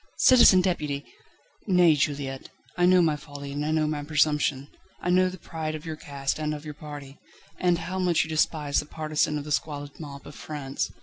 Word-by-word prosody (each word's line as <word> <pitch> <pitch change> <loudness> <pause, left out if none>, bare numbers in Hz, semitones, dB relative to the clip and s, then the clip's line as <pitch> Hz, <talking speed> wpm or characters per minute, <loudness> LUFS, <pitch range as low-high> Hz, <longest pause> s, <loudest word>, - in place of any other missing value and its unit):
"Citizen 235 -7 +7
Deputy!" 150 -6 -2 0.6
"Nay, 180 -4 +5
Juliette; 140 -2 -2 0.3
I 175 0 +3
know 180 -1 +6
my 155 -2 +2
folly, 140 0 -9
and 145 +1 -3
I 150 - -1
know 155 0 +2
my 150 -1 -2
presumption. 150 -2 +1 0.3
I 175 - -1
know 185 +1 +4
the 185 - -8
pride 160 -2 -5
of 155 - -8
your 160 -1 -4
caste 140 -1 -3
and 155 0 -1
of 150 +1 -10
your 150 - -6
party, 145 -2 -10 0.4
and 175 -1 +2
how 185 +2 -4
much 180 -3 +2
you 160 - -8
despise 155 -2 +1
the - - -5
partisan 155 -1 -1
of 145 - -4
the 150 - -8
squalid 145 -1 -3
mob 140 -3 -9
of 145 - -10
France. 140 -3 -4
150 Hz, 200 wpm, -26 LUFS, 145-165 Hz, 0.6 s, Citizen